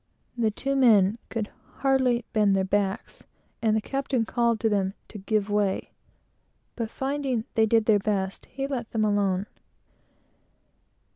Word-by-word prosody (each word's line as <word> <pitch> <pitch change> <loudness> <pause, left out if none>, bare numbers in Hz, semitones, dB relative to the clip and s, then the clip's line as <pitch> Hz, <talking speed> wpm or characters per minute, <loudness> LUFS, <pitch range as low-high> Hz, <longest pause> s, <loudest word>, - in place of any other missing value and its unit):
The 230 -2 +1
two 275 +6 -2
men 220 -5 +5
could 220 -3 -3 0.3
hardly 260 -3 +2
bend 210 -3 +3
their 190 - +2
backs, 195 +2 -2 0.3
and 220 -1 +2
the - - 0
captain 270 -2 -1
called 235 -1 +1
to 225 - +2
them 200 -2 0
to 210 - -8
"give 210 +1 0
way," 205 -2 +1
"give - - -5
way!" - - -31 0.8
but 230 -2 -3
finding 265 -3 -2
they 220 -1 +3
did 225 0 +3
their 215 -2 +4
best, 195 -2 -2
he 270 0 -4
let 255 -5 -4
them 220 -2 +2
alone. 200 -2 +1
220 Hz, 155 wpm, -26 LUFS, 205-240 Hz, 0.8 s, men